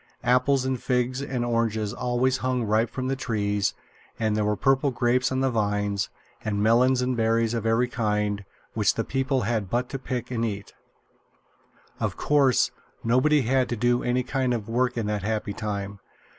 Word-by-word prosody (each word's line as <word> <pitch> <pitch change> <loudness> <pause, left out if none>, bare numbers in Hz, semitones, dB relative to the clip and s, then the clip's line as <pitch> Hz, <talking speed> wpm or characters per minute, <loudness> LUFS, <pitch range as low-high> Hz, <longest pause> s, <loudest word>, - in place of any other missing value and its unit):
Apples 130 +1 +3
and 130 -2 -1
figs 125 +1 0
and 130 -3 -2
oranges 110 -3 0
always 125 +1 +1
hung 130 -1 -1
ripe 110 +1 +1
from 130 -1 -4
the 135 - 0
trees; 105 -5 -1 0.4
and 110 -2 +1
there 105 - +1
were 105 0 +1
purple 135 +6 +2
grapes 125 +1 +1
on 130 0 0
the 135 -1 +2
vines, 105 -2 0 0.3
and 105 -1 -1
melons 125 +3 +4
and 125 0 0
berries 115 0 +1
of 115 -1 -1
every 115 +2 +3
kind, 105 -3 -1 0.3
which 105 -3 +2
the 115 - 0
people 135 +1 0
had 110 -3 -1
but 120 +3 -1
to 135 - -4
pick 125 -2 -4
and 115 -2 -1
eat. 100 -3 -4 1.3
Of - - -2
course 140 -4 +3 0.3
nobody 130 +5 +3
had 130 +2 +1
to 120 - -1
do 120 +2 +2
any 125 +1 0
kind 130 -1 0
of 110 -3 -5
work 125 +2 0
in 115 - -1
that 105 -1 -1
happy 105 0 -2
time. 100 -1 -4
120 Hz, 180 wpm, -25 LUFS, 105-130 Hz, 1.3 s, melons